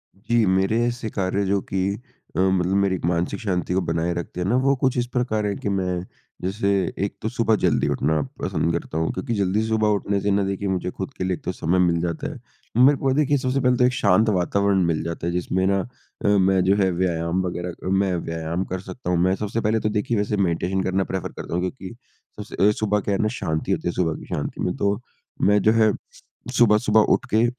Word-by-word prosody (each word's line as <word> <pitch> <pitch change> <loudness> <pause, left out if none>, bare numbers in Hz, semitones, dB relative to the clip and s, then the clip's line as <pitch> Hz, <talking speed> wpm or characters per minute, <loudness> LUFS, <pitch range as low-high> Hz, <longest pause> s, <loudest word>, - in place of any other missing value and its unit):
जी, 115 +3 +1
मेरे 95 +4 +2
ऐसे 120 -1 -3
कार्य 100 0 -1
जो 100 +1 +1
कि 95 0 +1 0.5
अ, - - -1
मतलब 95 -1 +2
मेरी 95 -1 +1
मानसिक 85 0 0
शांति 90 -6 -1
को 95 - +2
बनाए 85 +1 0
रखते 85 +1 -5
हैं 90 - -1
ना, 120 - +2
वो 135 +2 +3
कुछ 130 -2 +2
इस 120 - +1
प्रकार 110 -4 0
हैं 100 -1 -1
कि - - -2
मैं 90 -2 -1 0.4
जैसे 100 +2 -1 0.4
एक - - -6
तो - - -1
सुबह - - +2
जल्दी - - +2
उठना 75 +1 +1 0.2
पसंद 85 - 0
करता 85 -1 -3
हूँ, 80 0 0
क्योंकि 120 - -3
जल्दी 100 +1 +1
सुबह 110 -1 +1
उठने 100 0 -1
से 100 +1 +1
ना 100 0 +2
देखिए 100 +1 -2
मुझे 90 -1 -1
खुद 140 - -6
के - - -2
लिए 95 0 0
एक - - -7
तो - - 0
समय 90 +1 0
मिल 85 -2 +3
जाता 85 -1 -3
है। - - -11 0.4
मेरे 140 +2 +6
को 135 0 0
देखिए 145 0 +2
सबसे 130 +1 0
पहले 125 -1 +3
तो 125 - +4
एक 125 - +2
शांत 110 0 +3
वातावरण 100 0 +2
मिल 85 -2 0
जाता 85 0 -4
है, 85 - -1
जिसमें 90 +1 0
ना 100 0 +2 0.5
अ, - - +4
मैं 95 -2 +4
जो 95 +2 +3
है 95 - +3
व्यायाम 85 0 0
वग़ैरह 90 0 -3 0.2
अ, - - 0
मैं 95 -1 +2
व्यायाम 80 +1 -3
कर 95 - -4
सकता 100 -1 -7
हूँ। 90 - +2
मैं 95 +1 +3
सबसे 105 +3 -3
पहले 110 +1 +1
तो 105 - -1
देखिए 105 +2 -1
वैसे 105 0 0
मेडिटेशन 95 +1 0
करना 95 +1 +1
प्रेफ़र 95 -2 -3
करता - - -7
हूँ 90 - 0
क्योंकि 95 +2 -5 0.4
सबसे 100 0 0
अ, - - +4
सुबह 105 0 0
क्या 100 0 -1
है - - 0
ना, 110 - +2
शांति 85 -9 -2
होती - - -1
है, 85 - +1
सुबह 80 -3 0
की - - -11
शांति - - -4
में 90 - -1
तो 100 +1 0 0.4
मैं 105 +1 +4
जो 110 - +4
है 110 -2 +4 0.7
सुबह-सुबह 110 -1 +5
उठ - - 0
के 110 +2 +4
95 Hz, 235 wpm, -23 LUFS, 90-110 Hz, 0.7 s, मेरे